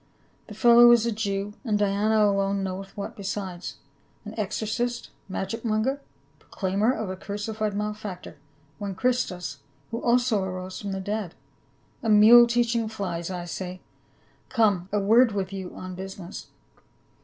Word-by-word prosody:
The 210 - -10
fellow 240 +1 +7
is 235 -1 +5
a 235 - +1
Jew 205 -1 -2
— - - -37
and 215 -5 +1
Diana 210 +1 +2
alone 195 -1 +1
knoweth 190 +1 -6
what 200 - -5
besides 190 -3 -5 0.3
— - - -37
an 210 - -7
exorcist, 225 +3 -2 0.2
magic 195 +4 -4
monger, 235 +5 0 0.4
proclaimer 200 +5 0
of 220 -7 -3
a - - -4
crucified 210 +2 -3
malefactor, 210 -5 -5 0.4
one 200 -2 -4
Christus, 190 - -1 0.3
who 230 - -3
also 240 -3 +2
arose 185 0 -5
from 200 -1 -4
the 195 - -3
dead. 205 -2 -3 0.7
A 225 - -1
mule 225 +3 +8
teaching 235 -1 +1
flies, 180 -6 -4 0.2
say 185 -2 -4
I. 185 - -13 0.7
Come, 200 -5 +2
a 210 - +1
word 225 +3 +5
with 195 -1 -3
you 190 -2 -6
on 185 0 -7
business." 190 0 -8
205 Hz, 150 wpm, -26 LUFS, 190-225 Hz, 0.7 s, mule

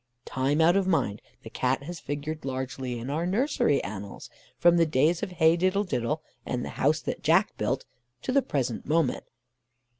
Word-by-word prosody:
Time 135 +4 0
out 170 +3 +5
of 195 -1 +2
mind 110 - 0 0.2
the 110 - -8
Cat 130 +2 0
has 170 +3 -7
figured 150 +2 -5
largely 130 -1 -4
in 120 +4 -5
our 165 +4 -1
nursery 205 - +1
annals 100 -1 -7 0.3
from 175 0 +5
the 165 - +5
days 155 +4 +2
of 195 -4 -4
Heigh 160 -1 +4
Diddle 185 +3 +1
Diddle 150 - -2 0.2
and 125 -1 -3
the - - -5
House 155 +3 +1
that - - -4
Jack - - +3
Built - - -1 0.4
to - - -1
the 275 +1 +4
present 130 - -2
moment. 155 -3 +1
150 Hz, 180 wpm, -27 LUFS, 130-175 Hz, 0.4 s, out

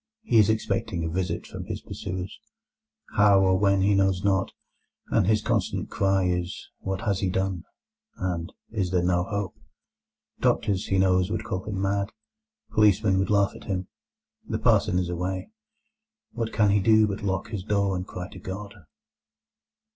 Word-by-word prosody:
He 115 - +4
is 105 - +5
expecting 100 -5 -1
a - - -1
visit 90 +2 -2
from - - -7
his - - -4
pursuers—how 95 +2 -2
or 95 -1 +3
when 100 -1 +3
he 100 +1 +4
knows 95 -1 +2
not—and 95 -2 -2
his 110 0 +3
constant - - -1
cry 95 -1 +2
is 90 0 -2
"What 95 0 -3
has 100 -4 0
he 95 - 0
done?" 95 -2 -1 0.5
and 85 -3 -3 0.2
"Is 100 -5 -1
there 90 -1 +1
no 90 0 +2
hope?" 100 -2 -3 0.9
Doctors, 100 -1 +1
he 95 - +1
knows, 95 -1 +3
would 110 +1 -2
call 95 -3 -3
him 100 -3 -3
mad, 100 +1 0 0.6
policemen 105 -2 +4
would 95 - 0
laugh 100 -1 +3
at - - -12
him. 95 -2 -3 0.6
The - - 0
parson 90 - +3
is 90 -1 0
away. 90 - -3 0.8
What 115 -1 -3
can 105 -2 +3
he 100 - +4
do 110 +2 +5
but 100 0 -3
lock 95 +1 -2
his 105 -5 -4
door 100 -2 +1
and 90 +1 -4
cry 90 0 -6
to 95 - -11
God? 100 +3 -6
95 Hz, 160 wpm, -26 LUFS, 95-100 Hz, 0.9 s, is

